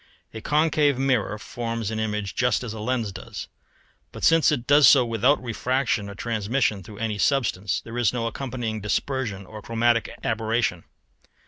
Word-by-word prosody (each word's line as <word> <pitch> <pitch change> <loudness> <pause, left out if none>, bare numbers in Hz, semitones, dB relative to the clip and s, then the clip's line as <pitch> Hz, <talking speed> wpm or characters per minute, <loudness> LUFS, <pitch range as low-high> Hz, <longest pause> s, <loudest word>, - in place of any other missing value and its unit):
A 110 - -7
concave 150 -1 +2
mirror 130 -6 0
forms 115 0 -4
an 110 - -3
image 105 -3 -2
just 125 0 +1
as 115 -3 -5
a 110 - -7
lens 115 -1 -1
does, 95 0 -8 0.6
but - - -10
since 165 -1 +5
it 130 -5 -1
does 145 +1 +6
so 130 -4 +7
without 120 +5 +2
refraction 120 -2 -1
or 100 - -8
transmission 110 0 -1
through 100 +3 -12
any 110 -1 -3
substance, 105 -9 +1
there 115 +1 -6
is 115 -4 +3
no 120 -2 -2
accompanying 115 -2 -4
dispersion 105 -1 -2
or 105 +2 -10
chromatic 115 +1 +1
aberration. 110 -5 -1
115 Hz, 160 wpm, -24 LUFS, 105-130 Hz, 0.6 s, so